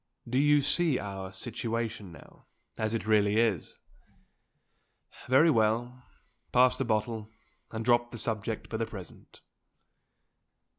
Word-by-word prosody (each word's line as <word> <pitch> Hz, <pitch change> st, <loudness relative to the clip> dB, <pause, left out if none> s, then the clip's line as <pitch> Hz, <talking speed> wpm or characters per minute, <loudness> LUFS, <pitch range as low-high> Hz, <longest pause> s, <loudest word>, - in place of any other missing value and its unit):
Do 125 Hz, +2 st, +1 dB
you 145 Hz, 0 st, +5 dB
see 145 Hz, 0 st, +1 dB
our 95 Hz, -2 st, -6 dB
situation 115 Hz, -1 st, -4 dB
now, 85 Hz, -, -16 dB, 0.3 s
as 110 Hz, +1 st, -1 dB
it 115 Hz, -, -3 dB
really 105 Hz, 0 st, +3 dB
is? 110 Hz, -8 st, 0 dB, 1.5 s
Very 145 Hz, +6 st, +5 dB
well. 120 Hz, +1 st, +1 dB, 0.5 s
Pass 125 Hz, 0 st, +5 dB
the -, -, -1 dB
bottle, 110 Hz, -1 st, -1 dB, 0.4 s
and 110 Hz, 0 st, -5 dB
drop 120 Hz, 0 st, +3 dB
the 120 Hz, -, -8 dB
subject 110 Hz, -1 st, -3 dB
for 110 Hz, -, -4 dB
the 115 Hz, -, -1 dB
present." 95 Hz, -5 st, -11 dB
115 Hz, 120 wpm, -29 LUFS, 105-125 Hz, 1.5 s, you